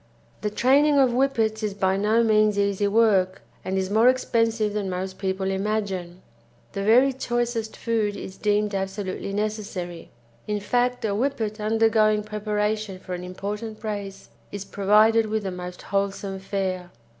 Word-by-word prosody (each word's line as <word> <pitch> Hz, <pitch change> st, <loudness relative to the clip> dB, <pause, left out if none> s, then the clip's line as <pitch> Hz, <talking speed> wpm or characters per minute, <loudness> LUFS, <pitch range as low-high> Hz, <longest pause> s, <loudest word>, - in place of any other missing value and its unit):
The 210 Hz, -, -1 dB
training 280 Hz, +7 st, +4 dB
of 265 Hz, -3 st, +5 dB
Whippets 235 Hz, -4 st, +1 dB
is 210 Hz, -2 st, -2 dB
by 190 Hz, -1 st, +1 dB
no 215 Hz, +4 st, +2 dB
means 215 Hz, -2 st, +3 dB
easy 200 Hz, 0 st, +1 dB
work, 200 Hz, -3 st, +2 dB, 0.2 s
and 190 Hz, +1 st, -2 dB
is 190 Hz, 0 st, -1 dB
more 225 Hz, +4 st, +5 dB
expensive 230 Hz, -4 st, +1 dB
than 205 Hz, -2 st, -2 dB
most 185 Hz, +1 st, -4 dB
people 190 Hz, 0 st, -1 dB
imagine. 190 Hz, -3 st, -3 dB, 0.5 s
The 195 Hz, -, -4 dB
very 245 Hz, +6 st, +5 dB
choicest 240 Hz, -3 st, -2 dB
food 220 Hz, -3 st, 0 dB
is 190 Hz, -, -8 dB
deemed 210 Hz, 0 st, 0 dB
absolutely 195 Hz, 0 st, -3 dB
necessary, 200 Hz, -4 st, -4 dB, 0.4 s
in 210 Hz, -1 st, -1 dB
fact 245 Hz, +3 st, 0 dB
a -, -, 0 dB
Whippet 220 Hz, -2 st, -1 dB
undergoing 215 Hz, -1 st, +3 dB
preparation 210 Hz, -1 st, -2 dB
for 185 Hz, 0 st, -8 dB
an 180 Hz, 0 st, -5 dB
important 210 Hz, +5 st, -6 dB
race 205 Hz, -2 st, -5 dB, 0.2 s
is 200 Hz, -1 st, -6 dB
provided 215 Hz, +3 st, +4 dB
with 215 Hz, 0 st, -1 dB
the 190 Hz, -, -3 dB
most 180 Hz, 0 st, -7 dB
wholesome 195 Hz, 0 st, -2 dB
fare. 190 Hz, -2 st, -3 dB
210 Hz, 150 wpm, -24 LUFS, 195-225 Hz, 0.5 s, of